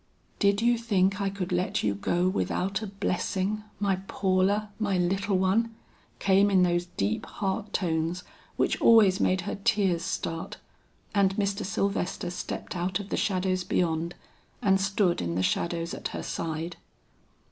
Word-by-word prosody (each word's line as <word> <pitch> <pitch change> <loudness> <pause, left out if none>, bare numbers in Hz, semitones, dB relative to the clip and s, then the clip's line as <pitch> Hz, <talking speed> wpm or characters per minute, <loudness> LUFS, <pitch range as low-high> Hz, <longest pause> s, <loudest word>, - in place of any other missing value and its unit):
"Did 200 +1 +3
you 240 0 +3
think 200 -3 +1
I 200 - +1
could 190 -2 -4
let 180 +1 0
you 105 -1 +2
go 175 - 0
without 190 +1 -1
a 215 - -4
blessing, 195 +1 -1 0.2
my 200 -2 +1
Paula, 200 +2 +1
my 200 -3 +1
little 190 +2 +1
one!" 220 +5 +1 0.4
came 195 +1 +4
in 190 -2 +4
those 175 0 +1
deep 100 +2 -1
heart 195 +1 -3
tones 170 -1 -1 0.3
which - - 0
always 210 -4 +6
made 185 -3 +2
her 180 - -5
tears 200 -7 +2
start. 165 0 -4 0.6
And 195 -2 +3
Mr. 200 0 -1
Sylvester 195 -2 -1
stepped 180 - -5
out 180 +2 -1
of 200 0 -7
the - - -1
shadows 185 -2 0
beyond 170 -1 0 0.4
and 195 -1 +3
stood 195 -2 +1
in 85 -1 -2
the 95 - +1
shadows 170 - -1
at - - -4
her - - -6
side. 165 +1 -4
190 Hz, 155 wpm, -27 LUFS, 175-200 Hz, 0.6 s, always